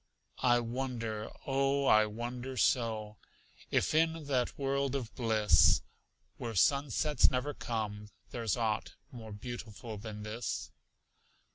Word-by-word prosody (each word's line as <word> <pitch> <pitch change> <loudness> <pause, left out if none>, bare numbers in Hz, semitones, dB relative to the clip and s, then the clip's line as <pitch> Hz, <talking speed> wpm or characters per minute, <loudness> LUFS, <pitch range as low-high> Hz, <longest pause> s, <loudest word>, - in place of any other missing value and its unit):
I 120 -1 +5
wonder, 115 -3 -3 0.2
oh, 135 +1 +1
I 110 -4 +6
wonder 120 +4 -5
so, 110 -5 +1 0.5
If - - +1
in 160 0 +2
that 130 -4 0
world 140 0 0
of 125 -5 -4
bliss 110 -4 +4 0.5
Where 115 -2 -5
sunsets 140 - +3
never 135 +3 -1
come, 105 -4 -4 0.2
there's 115 -3 -1
aught 110 -3 -1 0.2
More 115 -4 -9
beautiful 110 0 -7
than 105 -1 -7
this. 110 +2 -4
120 Hz, 115 wpm, -32 LUFS, 110-135 Hz, 0.5 s, I